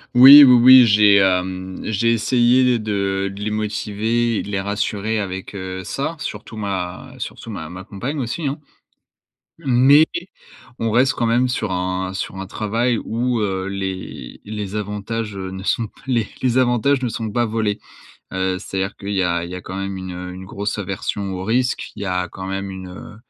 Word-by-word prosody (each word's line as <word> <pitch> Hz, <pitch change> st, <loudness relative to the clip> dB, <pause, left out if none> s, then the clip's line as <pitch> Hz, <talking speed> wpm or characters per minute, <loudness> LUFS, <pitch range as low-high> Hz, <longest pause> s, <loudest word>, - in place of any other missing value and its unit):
Oui, 135 Hz, +4 st, +11 dB
oui, 125 Hz, -, +8 dB
oui 130 Hz, 0 st, +9 dB
j'ai, 105 Hz, -1 st, +6 dB
hem 95 Hz, -1 st, 0 dB
j'ai 110 Hz, +2 st, +1 dB
essayé 120 Hz, +2 st, +3 dB
de 100 Hz, -2 st, -1 dB
les 105 Hz, +1 st, -3 dB
motiver 110 Hz, +2 st, -1 dB
et -, -, -1 dB
de 100 Hz, -, -8 dB
les 95 Hz, -, -1 dB
rassurer 105 Hz, +2 st, -2 dB
avec, 95 Hz, -1 st, -5 dB
heu, 95 Hz, -1 st, -6 dB
ça, 140 Hz, -, -3 dB
surtout 110 Hz, -3 st, -7 dB
ma 100 Hz, +4 st, -4 dB
surtout 115 Hz, -, -7 dB
ma 80 Hz, -7 st, -6 dB
ma 90 Hz, +2 st, -8 dB
compagne 120 Hz, +9 st, -5 dB
aussi, 135 Hz, +5 st, -3 dB
hein. 140 Hz, +3 st, -3 dB, 1.0 s
Mais 140 Hz, +1 st, +5 dB, 0.7 s
on 115 Hz, -1 st, -1 dB
reste 125 Hz, +4 st, +3 dB
quand 120 Hz, -, -1 dB
même 120 Hz, +2 st, +2 dB
sur 110 Hz, -5 st, -2 dB
un 95 Hz, +1 st, -2 dB
sur 95 Hz, 0 st, -4 dB
un 95 Hz, -, -5 dB
travail 110 Hz, +4 st, -1 dB
où, 120 Hz, +1 st, -1 dB
heu, 95 Hz, -3 st, -1 dB
les 95 Hz, -10 st, -6 dB
les 105 Hz, -1 st, -5 dB
avantages, 105 Hz, +1 st, -4 dB
heu, 95 Hz, -1 st, -5 dB
ne 95 Hz, 0 st, -7 dB
sont, 115 Hz, +2 st, 0 dB
pas -, -, -23 dB
les 120 Hz, -5 st, 0 dB, 0.2 s
les 125 Hz, 0 st, +3 dB
avantages 130 Hz, +2 st, +2 dB
ne 125 Hz, -, -1 dB
sont 110 Hz, -1 st, -4 dB
pas 120 Hz, +2 st, +1 dB
volés. 110 Hz, -2 st, -1 dB, 0.5 s
Heu, 95 Hz, 0 st, 0 dB
c'est-à-dire 95 Hz, +2 st, -4 dB
qu'il 100 Hz, +1 st, -5 dB
y 95 Hz, -, +1 dB
a 85 Hz, -1 st, 0 dB
il 85 Hz, -, -9 dB
y 90 Hz, -, -5 dB
a 90 Hz, -, -7 dB
quand 95 Hz, -, -8 dB
même 95 Hz, 0 st, -4 dB
une, 95 Hz, -1 st, -6 dB
heu 90 Hz, 0 st, -7 dB
une 95 Hz, +1 st, -9 dB
grosse 100 Hz, +2 st, -4 dB
aversion 100 Hz, 0 st, -3 dB
au 90 Hz, -, -5 dB
risque. 125 Hz, +4 st, 0 dB
Il 105 Hz, -, -8 dB
y 100 Hz, -, -3 dB
a 90 Hz, -1 st, -1 dB
quand 95 Hz, +2 st, -8 dB
même 95 Hz, 0 st, -4 dB
une 95 Hz, -1 st, -8 dB
heu 90 Hz, +3 st, -10 dB
105 Hz, 195 wpm, -20 LUFS, 95-120 Hz, 1.0 s, Oui